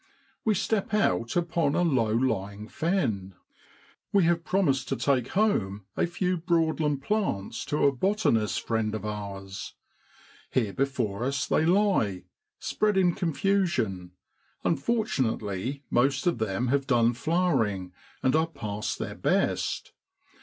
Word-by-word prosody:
We 215 Hz, -2 st, +2 dB
step 215 Hz, +1 st, 0 dB
out 115 Hz, -, +1 dB
upon 170 Hz, -4 st, +1 dB
a 175 Hz, -, +2 dB
low 130 Hz, -10 st, +2 dB
lying 105 Hz, -3 st, -1 dB
fen. 110 Hz, -, -1 dB, 0.8 s
We 200 Hz, -2 st, +4 dB
have 170 Hz, 0 st, +2 dB
promised 140 Hz, -10 st, +1 dB
to -, -, 0 dB
take 130 Hz, -4 st, +1 dB
home 105 Hz, -, 0 dB
a -, -, +1 dB
few 180 Hz, +1 st, -1 dB
Broad 165 Hz, -1 st, +1 dB
land 145 Hz, -3 st, 0 dB
plants 190 Hz, -, -1 dB
to 150 Hz, -, +1 dB
a 140 Hz, -, +6 dB
botanist 140 Hz, -, +1 dB
friend 110 Hz, -2 st, 0 dB
of 105 Hz, -1 st, -5 dB
ours. 100 Hz, 0 st, -6 dB, 0.7 s
Here 110 Hz, -6 st, 0 dB
before 120 Hz, -6 st, -1 dB
us 135 Hz, +1 st, 0 dB
they 160 Hz, -, +2 dB
lie, 175 Hz, -, +2 dB, 0.3 s
spread 210 Hz, -2 st, 0 dB
in 180 Hz, -2 st, +4 dB
con 165 Hz, -2 st, -1 dB
fusion; 130 Hz, -, 0 dB, 0.5 s
unfortunately 135 Hz, -, -1 dB
most 135 Hz, +5 st, +2 dB
of 175 Hz, -9 st, +1 dB
them 110 Hz, +3 st, -1 dB
have 140 Hz, +1 st, +1 dB
done 120 Hz, -2 st, +3 dB
flowering, 120 Hz, -, 0 dB, 0.3 s
and 130 Hz, -, +3 dB
are 160 Hz, +1 st, +3 dB
past 105 Hz, -9 st, -4 dB
their -, -, -4 dB
best. -, -, 0 dB
135 Hz, 135 wpm, -27 LUFS, 105-175 Hz, 0.8 s, a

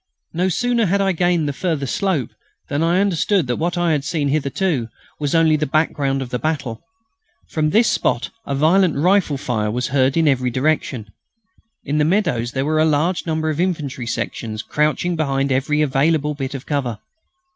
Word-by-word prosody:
No 180 Hz, +3 st, +1 dB
sooner 235 Hz, +3 st, +1 dB
had 200 Hz, +3 st, +1 dB
I 195 Hz, -1 st, +2 dB
gained 175 Hz, -3 st, +1 dB
the 145 Hz, -, -2 dB
further 155 Hz, -2 st, -2 dB
slope 155 Hz, -, -1 dB, 0.4 s
than 145 Hz, +2 st, -1 dB
I 170 Hz, +3 st, +3 dB
understood 195 Hz, -2 st, +1 dB
that 125 Hz, -1 st, -2 dB
what 175 Hz, +2 st, -1 dB
I 175 Hz, -1 st, +2 dB
had 145 Hz, -3 st, 0 dB
seen 150 Hz, -2 st, -1 dB
hitherto 145 Hz, -2 st, 0 dB, 0.3 s
was 145 Hz, +1 st, -1 dB
only 160 Hz, -1 st, +4 dB
the 150 Hz, 0 st, -1 dB
background 140 Hz, -2 st, 0 dB
of 125 Hz, -, -10 dB
the 125 Hz, -, -2 dB
battle. 145 Hz, -8 st, -3 dB, 0.7 s
From 155 Hz, -1 st, +1 dB
this 225 Hz, +7 st, +4 dB
spot -, -, 0 dB, 0.2 s
a 140 Hz, -, -1 dB
violent 165 Hz, +4 st, +3 dB
rifle 175 Hz, 0 st, +2 dB
fire 110 Hz, -5 st, -1 dB
was 125 Hz, +3 st, -2 dB
heard 135 Hz, +1 st, +2 dB
in 165 Hz, -1 st, +3 dB
every 130 Hz, -3 st, +2 dB
direction. 130 Hz, -4 st, -1 dB, 0.7 s
In 150 Hz, +2 st, 0 dB
the -, -, +4 dB
meadows 155 Hz, -, +1 dB
were 150 Hz, +4 st, +1 dB
a -, -, +5 dB
large 160 Hz, +4 st, +1 dB
number 160 Hz, -1 st, 0 dB
of 155 Hz, -, -4 dB
infantry 150 Hz, -9 st, -2 dB
sections 110 Hz, -1 st, -4 dB
crouching 155 Hz, +4 st, 0 dB
behind 140 Hz, -3 st, 0 dB
every 150 Hz, +3 st, +1 dB
available 150 Hz, +2 st, +1 dB
bit 140 Hz, -1 st, -5 dB
of 135 Hz, -, -7 dB
cover. 130 Hz, -7 st, -2 dB
150 Hz, 180 wpm, -20 LUFS, 135-170 Hz, 0.7 s, a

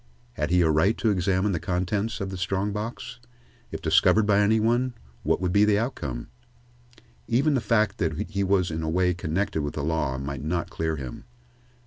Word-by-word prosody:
Had 75 Hz, +3 st, -2 dB
he 90 Hz, +1 st, +4 dB
a 80 Hz, -, +3 dB
right 85 Hz, +9 st, +2 dB
to 110 Hz, -, +2 dB
examine 95 Hz, +1 st, +1 dB
the 85 Hz, -, -1 dB
contents 100 Hz, +7 st, -2 dB
of 95 Hz, -2 st, -4 dB
this 95 Hz, -, -6 dB
strong 95 Hz, +2 st, -1 dB
box? 110 Hz, +2 st, -5 dB, 0.5 s
If -, -, -6 dB
discovered 110 Hz, -1 st, +4 dB
by 105 Hz, -1 st, +3 dB
any 105 Hz, +2 st, +3 dB
one, 120 Hz, +3 st, +1 dB, 0.3 s
what -, -, +1 dB
would 90 Hz, -1 st, -1 dB
be 100 Hz, -, +5 dB
the 105 Hz, -1 st, +4 dB
outcome? 75 Hz, -, -3 dB, 1.0 s
Even 135 Hz, +7 st, +2 dB
the 130 Hz, -, +1 dB
fact 110 Hz, -2 st, +1 dB
that 80 Hz, -5 st, 0 dB, 0.2 s
he 100 Hz, -1 st, 0 dB
was 95 Hz, -3 st, +1 dB
in 80 Hz, +1 st, -3 dB
a 80 Hz, -, -2 dB
way 90 Hz, +2 st, +2 dB
connected 90 Hz, +1 st, -2 dB
with 70 Hz, 0 st, -4 dB
the 70 Hz, -, -3 dB
law 75 Hz, -4 st, -1 dB
might 70 Hz, -1 st, -5 dB
not 85 Hz, +2 st, -2 dB
clear 80 Hz, -1 st, -2 dB
him. 65 Hz, -4 st, -7 dB
95 Hz, 195 wpm, -26 LUFS, 80-105 Hz, 1.0 s, be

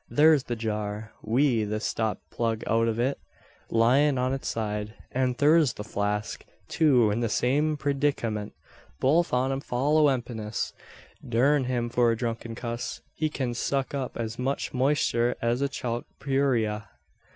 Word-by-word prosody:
Thur's 150 Hz, -2 st, +5 dB
the 120 Hz, -, -2 dB
jar, 105 Hz, -1 st, -3 dB
wi' 120 Hz, 0 st, +2 dB
the 105 Hz, +1 st, -2 dB
stop 110 Hz, 0 st, -2 dB
plug 115 Hz, -1 st, -1 dB
out 115 Hz, +1 st, +2 dB
o' 115 Hz, 0 st, -1 dB
it, 135 Hz, +2 st, -1 dB, 0.5 s
lyin' 130 Hz, +5 st, +4 dB
on 130 Hz, +1 st, 0 dB
its 135 Hz, -, -4 dB
side; 105 Hz, -1 st, -3 dB, 0.2 s
an 130 Hz, -1 st, 0 dB
thur's 150 Hz, 0 st, +4 dB
the 105 Hz, -, -7 dB
flask, 105 Hz, 0 st, -2 dB, 0.2 s
too, 125 Hz, -9 st, +4 dB
in 105 Hz, -, -1 dB
the 115 Hz, -1 st, 0 dB
same 150 Hz, +7 st, +1 dB
preedikamint 140 Hz, -8 st, -1 dB, 0.5 s
both 165 Hz, +6 st, +3 dB
on 125 Hz, +2 st, +1 dB
'em 135 Hz, -, -1 dB
fall 140 Hz, +4 st, +1 dB
o' 150 Hz, -, +6 dB
empiness. 115 Hz, -4 st, -3 dB, 0.5 s
Durn 130 Hz, +4 st, +2 dB
him 125 Hz, -2 st, -1 dB
for 120 Hz, 0 st, +2 dB
a 115 Hz, -, -1 dB
drunken 115 Hz, -1 st, -4 dB
cuss! 120 Hz, 0 st, -5 dB
He 155 Hz, -1 st, -1 dB
kin 130 Hz, -5 st, -2 dB
suck 135 Hz, +3 st, -1 dB
up 135 Hz, -3 st, -3 dB
as 115 Hz, +1 st, -4 dB
much 135 Hz, +2 st, -2 dB
moister 125 Hz, -3 st, +2 dB
as 120 Hz, +2 st, 0 dB
a 140 Hz, -, +1 dB
chalk 120 Hz, -3 st, -3 dB
purayra. 120 Hz, -7 st, 0 dB
120 Hz, 160 wpm, -27 LUFS, 115-140 Hz, 0.5 s, o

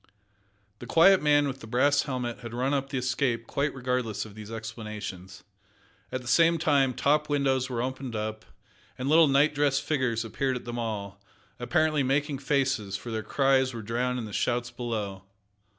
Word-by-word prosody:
The 120 Hz, -, -9 dB
quiet 190 Hz, +7 st, +6 dB
man 145 Hz, -1 st, +4 dB
with 135 Hz, -1 st, -5 dB
the 115 Hz, -, -10 dB
brass 140 Hz, +5 st, +3 dB
helmet 125 Hz, -3 st, -4 dB
had 120 Hz, -1 st, -8 dB
run 130 Hz, +3 st, 0 dB
up 135 Hz, -1 st, -1 dB
the 140 Hz, -, -3 dB
Escape 125 Hz, -2 st, 0 dB
quite 140 Hz, +5 st, -1 dB
regardless 125 Hz, -5 st, -2 dB
of 105 Hz, -, -12 dB
these 105 Hz, 0 st, -10 dB
explanations. 105 Hz, -4 st, -7 dB, 0.7 s
At 130 Hz, 0 st, -4 dB
the -, -, -11 dB
same 165 Hz, +6 st, +4 dB
time 140 Hz, -5 st, +2 dB
top 150 Hz, +1 st, +2 dB
windows 135 Hz, -3 st, +1 dB
were 120 Hz, -2 st, -2 dB
opened 130 Hz, -2 st, -4 dB
up, 110 Hz, 0 st, -4 dB, 0.5 s
and 130 Hz, -, -3 dB
little 160 Hz, +2 st, +6 dB
night 140 Hz, +2 st, +3 dB
dressed 140 Hz, -1 st, +1 dB
figures 130 Hz, -6 st, 0 dB
appeared 130 Hz, +4 st, -1 dB
at 125 Hz, -, -6 dB
them 120 Hz, 0 st, -4 dB
all, 100 Hz, -3 st, -4 dB, 0.4 s
apparently 155 Hz, +3 st, +1 dB
making 140 Hz, +1 st, 0 dB
faces, 130 Hz, -8 st, 0 dB
for 120 Hz, -, -8 dB
their 110 Hz, -1 st, -2 dB
cries 130 Hz, +1 st, +2 dB
were 115 Hz, -, -6 dB
drowned 125 Hz, +3 st, -1 dB
in 120 Hz, -, -4 dB
the 105 Hz, -, -9 dB
shouts 120 Hz, +2 st, -1 dB
below. 105 Hz, -6 st, -4 dB
125 Hz, 180 wpm, -27 LUFS, 115-140 Hz, 0.7 s, quiet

